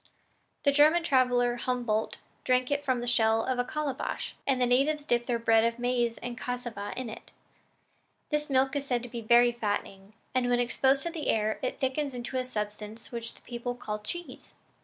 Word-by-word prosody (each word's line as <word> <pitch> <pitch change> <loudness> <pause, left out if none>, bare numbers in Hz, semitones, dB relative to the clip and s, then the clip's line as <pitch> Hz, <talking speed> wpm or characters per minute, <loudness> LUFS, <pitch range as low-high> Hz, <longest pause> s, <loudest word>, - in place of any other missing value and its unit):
The 280 - +5
German 305 +4 +5
traveler 250 -4 +3
Humboldt 240 -3 -1 0.3
drank 255 +1 +2
it 285 0 0
from 260 -3 0
the - - -3
shell 225 -2 +3
of 255 -1 -1
a - - +3
calabash, 290 0 -3
and 265 -2 +2
the 250 - +4
natives 280 +5 +2
dip 240 -3 +1
their 240 -2 +1
bread 225 -1 +4
of 230 0 +1
maize 240 -1 0
or 245 0 -3
cassava 240 -4 -5
in 255 -1 -3
it. 220 - -9 1.0
This 300 0 0
milk 265 +1 +2
is 285 - 0
said 245 -2 0
to 245 - -7
be 235 0 -5
very 240 +2 +5
fattening; 205 -3 -4 0.2
and 255 -1 +1
when 245 0 +3
exposed 265 +3 +2
to 340 - -2
the 320 -3 -5
air, 215 0 +1
it 255 - -3
thickens 270 +1 -1
into 245 +2 -4
a 255 - -1
substance 210 -1 -5
which 235 -1 -5
the - - -20
people 245 0 -5
call 210 -3 -4
cheese." 345 +12 -7
245 Hz, 195 wpm, -29 LUFS, 230-265 Hz, 1.0 s, The